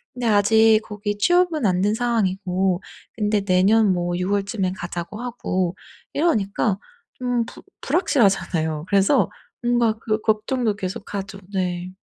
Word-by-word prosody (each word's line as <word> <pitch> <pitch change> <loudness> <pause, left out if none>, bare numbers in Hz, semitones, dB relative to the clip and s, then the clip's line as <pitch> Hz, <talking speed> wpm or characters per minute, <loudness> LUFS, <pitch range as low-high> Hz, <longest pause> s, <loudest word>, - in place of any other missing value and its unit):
근데 245 - -4
아직 220 +1 +5
거기 205 -1 -4
취업은 345 - +2
안 180 -1 +2
된 205 +2 +2
상황이고 190 -5 0 0.3
근데 210 -1 +1
내년 195 +3 +4
뭐 175 0 -1
6 180 +1 -2
월쯤에 200 -2 0
가자고 175 +5 -6
하고 185 -7 -2 0.4
이러니까 215 - +1 0.4
좀 245 -2 -1
부 - - -12 0.2
불확실하잖아요. 190 - +1
그래서 200 +7 +3 0.3
뭔가 240 -2 +2
그 215 -1 -1
걱정도 220 +1 0
계속 195 +1 -6
하죠. 195 0 -5
네. 180 -1 -2
205 Hz, 275 characters per minute, -22 LUFS, 185-230 Hz, 0.4 s, 아직